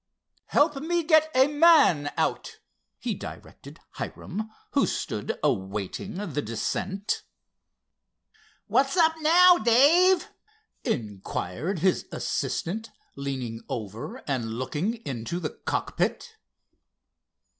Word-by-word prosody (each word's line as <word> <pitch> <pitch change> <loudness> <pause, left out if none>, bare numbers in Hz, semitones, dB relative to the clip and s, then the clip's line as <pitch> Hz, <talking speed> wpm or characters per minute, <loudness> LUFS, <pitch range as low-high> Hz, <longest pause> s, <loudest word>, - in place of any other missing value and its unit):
"Help 295 -1 +3
me 340 +4 0
get 315 -1 +4
a 260 +1 +7
man 295 - +5
out," - - -1 0.4
he - - -3
directed - - -10 0.2
Hiram, 215 +4 -5 0.2
who - - +2
stood - - -3
awaiting 100 - -2
the 170 -7 -3
descent. 185 - -2 1.4
"What's 275 +6 +1
up 325 -2 +5
now, 350 +3 +7
Dave?" 320 +11 +5 0.6
inquired 105 - -3
his 185 +2 +1
assistant, 220 +7 -3 0.3
leaning 130 -5 -4
over 110 0 -6
and 120 -5 -2
looking 145 - -2
into 135 +6 -4
the - - -3
cockpit. 470 -2 -2
195 Hz, 95 wpm, -26 LUFS, -, 1.4 s, a